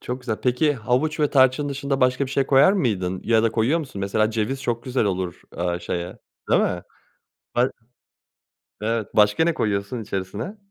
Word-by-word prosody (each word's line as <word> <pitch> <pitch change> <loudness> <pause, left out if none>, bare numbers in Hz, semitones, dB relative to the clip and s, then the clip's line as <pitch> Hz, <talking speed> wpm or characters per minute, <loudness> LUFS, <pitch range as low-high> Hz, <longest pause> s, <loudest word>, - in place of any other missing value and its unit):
Çok 125 +1 -5
güzel. 120 -4 -3
Peki, 125 +4 +2
havuç 130 +6 0
ve 150 - +2
tarçın 130 +1 +3
dışında 140 0 -2
başka 130 +2 +2
bir - - -9
şey 135 0 +1
koyar 140 +7 +6
mıydın 95 - -1
ya 115 -1 +3
da 115 -1 +1
koyuyor 120 +9 +2
musun, 130 -10 -6
mesela, 110 +2 +1
ceviz 115 +5 -2
çok 120 -2 -2
güzel 130 -2 0
olur, 95 -3 -2 0.2
aaa, 85 0 -1
şeye, 85 +1 -5 0.3
değil - - +5
mi? 90 -1 -1 0.7
Ha 125 +2 +2 1.1
Evet. 115 -1 -1
Başka 105 +8 +4
ne 170 0 +1
koyuyorsun 105 0 -2
içerisine? 105 - -5
120 Hz, 175 wpm, -23 LUFS, 100-135 Hz, 1.1 s, koyar